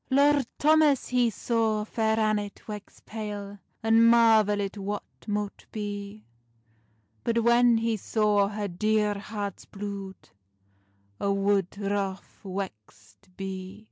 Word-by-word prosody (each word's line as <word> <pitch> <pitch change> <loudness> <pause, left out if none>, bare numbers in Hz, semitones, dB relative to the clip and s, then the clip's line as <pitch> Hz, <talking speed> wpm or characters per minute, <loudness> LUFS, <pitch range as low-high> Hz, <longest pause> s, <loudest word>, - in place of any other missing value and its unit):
Lord 280 -1 +4
Thomas 305 -2 +4
he 245 -2 +3
saw 220 -1 0
Fair 220 0 0
Annet 210 -2 -1
wex 210 -2 -9
pale, 205 -2 -6 0.2
And 225 +1 +5
marvelit 215 -4 +4
what 205 0 -4 0.2
mote 205 -1 -3
bee; 205 0 -6 1.0
But 230 0 +1
when 235 0 +5
he 225 0 0
saw 210 -1 +2
her 205 0 -3
dear 210 +3 +1
heart's 205 -2 -5
blude, 200 -1 -7 0.9
A' 200 - 0
wood 195 -1 +1
wroth 200 -1 -3
wexed 185 - -8
bee. 190 +1 -6
210 Hz, 110 wpm, -27 LUFS, 200-225 Hz, 1.0 s, And